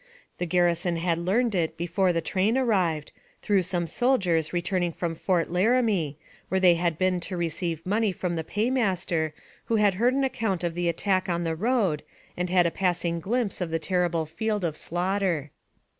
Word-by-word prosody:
The 180 Hz, -, -1 dB
gar 180 Hz, +1 st, +3 dB
rison 170 Hz, 0 st, +1 dB
had 165 Hz, 0 st, 0 dB
learned 215 Hz, +7 st, +1 dB
it 170 Hz, -4 st, -1 dB
before 180 Hz, +2 st, +1 dB
the 165 Hz, -1 st, 0 dB
train 200 Hz, +8 st, +1 dB
arrived, 185 Hz, -, +1 dB, 0.3 s
through 200 Hz, -2 st, +3 dB
some 175 Hz, -1 st, -2 dB
soldiers 175 Hz, -, +1 dB
returning 175 Hz, 0 st, -1 dB
from 170 Hz, 0 st, -3 dB
Fort 170 Hz, 0 st, 0 dB
Laramie, 195 Hz, -, +2 dB, 0.3 s
where 190 Hz, -, +1 dB
they 180 Hz, -2 st, +6 dB
had 170 Hz, -2 st, 0 dB
been 185 Hz, 0 st, +1 dB
to 180 Hz, +1 st, -5 dB
receive 165 Hz, -1 st, -2 dB
money 210 Hz, +2 st, +1 dB
from 180 Hz, -1 st, -3 dB
the 160 Hz, -, -2 dB
paymaster, 195 Hz, -7 st, 0 dB, 0.3 s
who 230 Hz, -, 0 dB
had 210 Hz, -2 st, +4 dB
heard 240 Hz, +7 st, +2 dB
an 275 Hz, -, +1 dB
account 220 Hz, -9 st, -1 dB
of 170 Hz, -1 st, -1 dB
the 175 Hz, 0 st, 0 dB
attack 185 Hz, +2 st, 0 dB
on 170 Hz, 0 st, 0 dB
the 165 Hz, -1 st, -1 dB
road, 200 Hz, -5 st, +1 dB, 0.3 s
and 180 Hz, 0 st, -2 dB
had 180 Hz, -1 st, +4 dB
a 170 Hz, -, +1 dB
passing 175 Hz, -2 st, 0 dB
glimpse 215 Hz, +2 st, -1 dB
of 175 Hz, -, -1 dB
the 165 Hz, -, 0 dB
terrible 170 Hz, -1 st, 0 dB
field 205 Hz, +6 st, -2 dB
of 160 Hz, -3 st, -2 dB
slaughter. 175 Hz, -3 st, -1 dB
180 Hz, 185 wpm, -26 LUFS, 170-200 Hz, 0.3 s, they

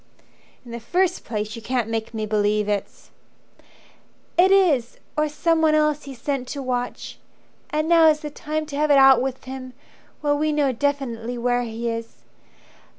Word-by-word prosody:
"In 240 Hz, -, -11 dB
the 235 Hz, -, -5 dB
first 360 Hz, +10 st, 0 dB
place 215 Hz, -1 st, -4 dB
you 230 Hz, -, -8 dB
can't 245 Hz, -1 st, -1 dB
make 225 Hz, -1 st, -3 dB
me 220 Hz, -2 st, -3 dB
believe 210 Hz, 0 st, +1 dB
it's 205 Hz, -2 st, -4 dB, 0.6 s
" -, -, -31 dB
"It -, -, +3 dB
is 320 Hz, -12 st, +3 dB, 0.2 s
or 305 Hz, 0 st, +1 dB
someone 320 Hz, +1 st, +2 dB
else 300 Hz, -1 st, +1 dB
he's 270 Hz, -3 st, -9 dB
sent 270 Hz, 0 st, -3 dB
to 280 Hz, 0 st, -5 dB
watch. 245 Hz, -1 st, -4 dB, 0.5 s
And 305 Hz, +1 st, -1 dB
now's 320 Hz, -2 st, +5 dB
the 300 Hz, -1 st, -6 dB
time 310 Hz, +1 st, -4 dB
to 295 Hz, -2 st, -8 dB
have 300 Hz, +1 st, +1 dB
it 285 Hz, -, +6 dB
out 270 Hz, -2 st, +7 dB
with 265 Hz, 0 st, -3 dB
him 260 Hz, -1 st, -8 dB, 0.5 s
While 290 Hz, -1 st, +1 dB
we 305 Hz, 0 st, +1 dB
know 290 Hz, -3 st, +2 dB
definitely 245 Hz, -3 st, -2 dB
where 245 Hz, +1 st, +1 dB
he 235 Hz, 0 st, -4 dB
is. 230 Hz, 0 st, -5 dB
265 Hz, 170 wpm, -23 LUFS, 230-300 Hz, 0.6 s, out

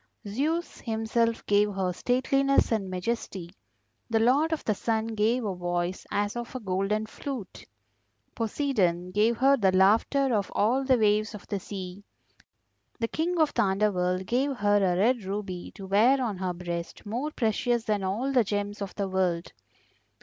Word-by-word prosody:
Zeus 305 Hz, +11 st, -2 dB
himself 230 Hz, 0 st, -1 dB
gave 205 Hz, 0 st, +3 dB
her 185 Hz, -2 st, -1 dB
stateliness 275 Hz, +6 st, +2 dB
and 205 Hz, -4 st, 0 dB
majesty, 185 Hz, -2 st, -4 dB, 0.6 s
the 225 Hz, -1 st, +2 dB
Lord 275 Hz, +8 st, +3 dB
of 320 Hz, -, -2 dB
the 215 Hz, -, +2 dB
Sun 220 Hz, +2 st, -1 dB
gave 225 Hz, +2 st, +1 dB
a 200 Hz, -, -1 dB
voice 175 Hz, 0 st, -3 dB
as 205 Hz, +1 st, -1 dB
of 240 Hz, +1 st, -6 dB
a -, -, -2 dB
golden 200 Hz, +1 st, -1 dB
flute; 245 Hz, -2 st, -7 dB, 0.7 s
Poseidon 205 Hz, -, 0 dB
gave 215 Hz, +4 st, +2 dB
her 270 Hz, +3 st, +5 dB
the 195 Hz, -6 st, +3 dB
laughter 225 Hz, +8 st, +3 dB
of 205 Hz, -3 st, 0 dB
all 245 Hz, +6 st, +2 dB
the 260 Hz, -1 st, +3 dB
waves 215 Hz, 0 st, +2 dB
of 205 Hz, -, -10 dB
the 200 Hz, -, -1 dB
sea, 190 Hz, 0 st, -7 dB, 1.0 s
the 230 Hz, -, 0 dB
King 340 Hz, +7 st, -1 dB
of 310 Hz, -2 st, +3 dB
the 235 Hz, -, +2 dB
Underworld 190 Hz, -3 st, +1 dB
gave 260 Hz, +7 st, 0 dB
her 205 Hz, -1 st, +3 dB
a 185 Hz, -3 st, +2 dB
red 230 Hz, +3 st, +2 dB
ruby 190 Hz, -2 st, -5 dB
to 195 Hz, -, -8 dB
wear 220 Hz, +8 st, +4 dB
on 225 Hz, -7 st, -2 dB
her 185 Hz, -1 st, -1 dB
breast 170 Hz, +1 st, -6 dB
more 240 Hz, +8 st, -2 dB
precious 235 Hz, -2 st, 0 dB
than 210 Hz, -3 st, -1 dB
all 215 Hz, +9 st, -1 dB
the 250 Hz, -3 st, +5 dB
gems 205 Hz, 0 st, -3 dB
of 195 Hz, -2 st, -5 dB
the 200 Hz, -1 st, -2 dB
world. 185 Hz, -3 st, -1 dB
210 Hz, 165 wpm, -27 LUFS, 190-240 Hz, 1.0 s, her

